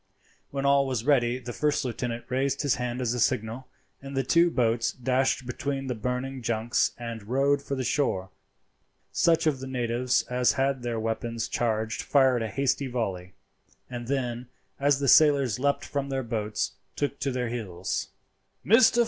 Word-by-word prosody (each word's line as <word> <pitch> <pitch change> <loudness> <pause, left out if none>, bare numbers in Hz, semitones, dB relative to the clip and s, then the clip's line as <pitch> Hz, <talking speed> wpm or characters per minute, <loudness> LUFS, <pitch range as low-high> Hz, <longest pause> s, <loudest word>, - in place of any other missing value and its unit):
When 140 0 -3
all 140 0 +4
was 125 -3 -2
ready 125 -4 +3
the 125 -1 -7
first 150 0 0
lieutenant 120 -1 -3
raised 135 +3 0
his 145 - +3
hand 125 +1 -2
as 120 -2 0
a 125 - -2
signal, 115 +3 0 0.3
and 135 0 -7
the 135 - +2
two 170 +6 +4
boats 115 -5 +1
dashed 130 +1 0
between 135 +2 -3
the 130 - -2
burning 125 +3 -3
junks 115 0 +1
and 115 -2 -6
rowed 140 +3 +2
for 140 0 -3
the 130 - -2
shore. 95 -10 0 0.8
Such 165 -1 +3
of 150 -4 +1
the 130 - -6
natives 125 -1 0
as 125 0 +1
had 135 -1 0
their 120 -2 -2
weapons 115 +1 -2
charged 110 -2 -1
fired 130 -4 +3
a 115 - -1
hasty 135 +5 0
volley, 95 -7 -3 0.6
and 120 -1 -5
then, 125 -2 -2 0.3
as 140 0 +3
the 140 - -1
sailors 140 -6 +5
leapt 140 +1 +1
from 140 -1 -3
their 135 -1 -1
boats, 110 -2 -2 0.2
took 145 -1 -2
to 140 - -1
their 125 -2 -2
heels. 95 -7 -3 0.6
"Mr. 230 +2 +6
125 Hz, 170 wpm, -27 LUFS, 115-140 Hz, 0.8 s, Mr